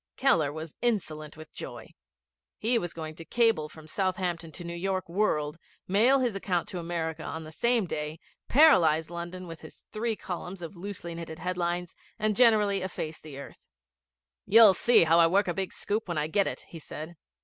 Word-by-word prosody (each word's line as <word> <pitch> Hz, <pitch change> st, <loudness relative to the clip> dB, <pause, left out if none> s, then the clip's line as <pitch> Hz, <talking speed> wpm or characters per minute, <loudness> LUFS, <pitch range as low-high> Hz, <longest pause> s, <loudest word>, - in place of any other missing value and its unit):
Keller 165 Hz, -, +3 dB
was 155 Hz, +1 st, -7 dB
insolent 155 Hz, -11 st, -2 dB
with 155 Hz, 0 st, -12 dB
joy. -, -, -8 dB, 0.7 s
He 235 Hz, +2 st, +1 dB
was 175 Hz, -4 st, -4 dB
going 160 Hz, -1 st, -6 dB
to 165 Hz, -, -8 dB
cable 225 Hz, -7 st, +2 dB
from 155 Hz, 0 st, -13 dB
Southampton 180 Hz, -2 st, -2 dB
to 175 Hz, -, -6 dB
the -, -, -7 dB
New 170 Hz, -, -4 dB
York 185 Hz, +2 st, -2 dB
World, 165 Hz, -5 st, 0 dB, 0.3 s
mail 225 Hz, +8 st, +5 dB
his 240 Hz, -5 st, 0 dB
account 185 Hz, -3 st, -1 dB
to 180 Hz, -, -5 dB
America 165 Hz, -2 st, -3 dB
on 160 Hz, +1 st, -5 dB
the 155 Hz, -, -10 dB
same 235 Hz, +5 st, +2 dB
day, 150 Hz, -1 st, -4 dB, 0.3 s
paralyse 170 Hz, -, +5 dB
London 175 Hz, +1 st, -6 dB
with 165 Hz, -1 st, -9 dB
his 160 Hz, -, -13 dB
three 225 Hz, +1 st, -1 dB
columns 180 Hz, -1 st, -6 dB
of 165 Hz, +4 st, -7 dB
loosely 175 Hz, -2 st, -6 dB
knitted 165 Hz, -1 st, -7 dB
headlines, 175 Hz, 0 st, -2 dB, 0.2 s
and 215 Hz, -1 st, +1 dB
generally 210 Hz, -5 st, +4 dB
efface 160 Hz, -4 st, -5 dB
the 150 Hz, -3 st, -10 dB
earth. 140 Hz, -, -11 dB, 0.8 s
'You'll 220 Hz, -1 st, +8 dB
see 235 Hz, +4 st, +5 dB
how 165 Hz, +1 st, +4 dB
I 165 Hz, -, +7 dB
work 195 Hz, +4 st, +2 dB
a 175 Hz, -, 0 dB
big 190 Hz, +1 st, -3 dB
scoop 215 Hz, +1 st, -2 dB
when 175 Hz, -3 st, -3 dB
I 150 Hz, -, +1 dB
get 195 Hz, +5 st, +1 dB
it,' -, -, -5 dB
he 165 Hz, -, -9 dB
said. 155 Hz, +2 st, -8 dB
175 Hz, 190 wpm, -28 LUFS, 160-200 Hz, 0.8 s, You'll